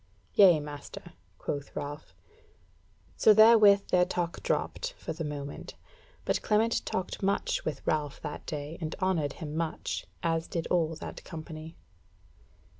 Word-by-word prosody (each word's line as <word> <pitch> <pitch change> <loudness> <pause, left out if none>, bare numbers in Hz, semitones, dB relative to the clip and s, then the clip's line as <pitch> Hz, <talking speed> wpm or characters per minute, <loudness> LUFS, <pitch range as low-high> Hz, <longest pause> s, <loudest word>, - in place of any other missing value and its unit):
"Yea 180 -6 +7
master," 145 -1 -9 0.2
quoth 140 -1 -5
Ralph. 145 +2 -6 1.0
So 215 - +6
therewith 215 -2 +7
their 180 0 +5
talk 175 -1 -2
dropped, - - -1
for - - -5
the 160 +1 -5
moment; 145 -1 -6 0.5
but - - +1
Clement 220 +2 +2
talked 185 0 -3
much 200 +1 0
with 150 -3 -4
Ralph 150 -2 -1
that 150 -2 -6
day, 150 0 -5
and 155 -1 -3
honoured 170 -7 0
him 155 -3 -7
much, 165 -1 -3 0.2
as 165 0 0
did 165 -2 -3
all 165 -2 +2
that - - -8
company. 160 -1 -8
165 Hz, 135 wpm, -29 LUFS, 150-185 Hz, 1.0 s, Yea